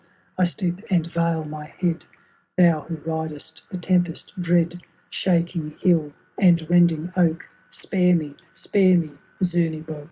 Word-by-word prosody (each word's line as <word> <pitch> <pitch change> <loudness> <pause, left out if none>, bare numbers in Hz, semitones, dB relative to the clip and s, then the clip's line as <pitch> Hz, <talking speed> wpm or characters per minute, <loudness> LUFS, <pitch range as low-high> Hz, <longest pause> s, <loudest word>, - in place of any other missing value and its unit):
I 185 - +3
stoop 175 0 -3
and 175 -4 +2
veil 170 -1 -1
my 150 0 -7
head; 170 +1 -3 0.5
Thou 170 -4 +5
who 165 - -4
ridest 160 0 -5
the 185 - -5
tempest 175 -1 -1
dread. 175 0 +1 0.3
Shaking 170 -3 -1
hill 165 -5 +2 0.3
and 170 -4 +4
rending 175 0 +3
oak 170 -2 +1 0.2
— - - -33
Spare 180 -2 +1
me! 150 -4 -3 0.2
spare 185 -3 +3
me! 160 -3 -2 0.3
Zemebock. 160 -3 -1
170 Hz, 135 wpm, -23 LUFS, 160-180 Hz, 0.5 s, Thou